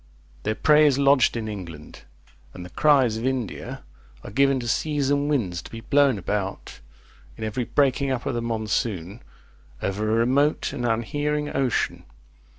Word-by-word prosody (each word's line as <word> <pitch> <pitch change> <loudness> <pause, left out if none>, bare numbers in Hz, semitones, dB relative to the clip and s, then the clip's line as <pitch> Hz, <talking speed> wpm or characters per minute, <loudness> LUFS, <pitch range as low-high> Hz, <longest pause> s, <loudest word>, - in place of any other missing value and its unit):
Their 110 +1 -1
prey 150 +3 +5
is 140 -2 +2
lodged 140 -4 +4
in 110 -1 -4
England; 85 -8 -9 0.5
and 90 - -8
the 90 - -12
cries 135 - +3
of 115 - -5
India 130 -6 -4 0.4
are - - -9
given 135 +3 +3
to 120 - -5
seas 145 +3 0
and 145 0 +1
winds, 95 -12 -1
to - - -12
be 115 - -8
blown 140 0 +3
about, 100 0 -4 0.6
in - - -6
every 110 +3 -2
breaking 140 0 +1
up 130 -2 -2
of - - -1
the 120 - -2
monsoon, 110 -3 -2 0.6
over 105 +6 -2
a 110 - +2
remote 130 +6 +1
and 120 -4 -2
unhearing 145 +6 -1
ocean. 130 -4 -1
120 Hz, 160 wpm, -24 LUFS, 110-140 Hz, 0.6 s, prey